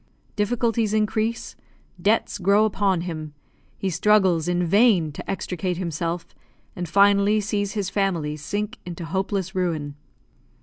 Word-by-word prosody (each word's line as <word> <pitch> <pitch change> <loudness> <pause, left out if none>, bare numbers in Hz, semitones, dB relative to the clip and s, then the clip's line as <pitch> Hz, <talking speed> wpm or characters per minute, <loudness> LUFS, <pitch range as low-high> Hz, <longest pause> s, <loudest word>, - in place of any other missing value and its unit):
Difficulties 225 0 0
increase, 215 +2 -1 0.5
debts 210 +2 +1
grow 200 +3 +4
upon 195 -4 +1
him, 155 -4 -6 0.4
he 190 - -2
struggles 185 -3 +3
in 175 0 +1
vain 195 -4 +4
to - - -9
extricate 180 -2 -2
himself, 170 -1 -3 0.4
and 175 -2 -5
finally 200 +2 +4
sees 205 -1 -2
his 200 -3 -2
family 170 -7 0
sink 205 +9 -4
into 175 -1 -7
hopeless 190 +2 -2
ruin. 165 -6 -2
195 Hz, 125 wpm, -23 LUFS, 170-210 Hz, 0.5 s, grow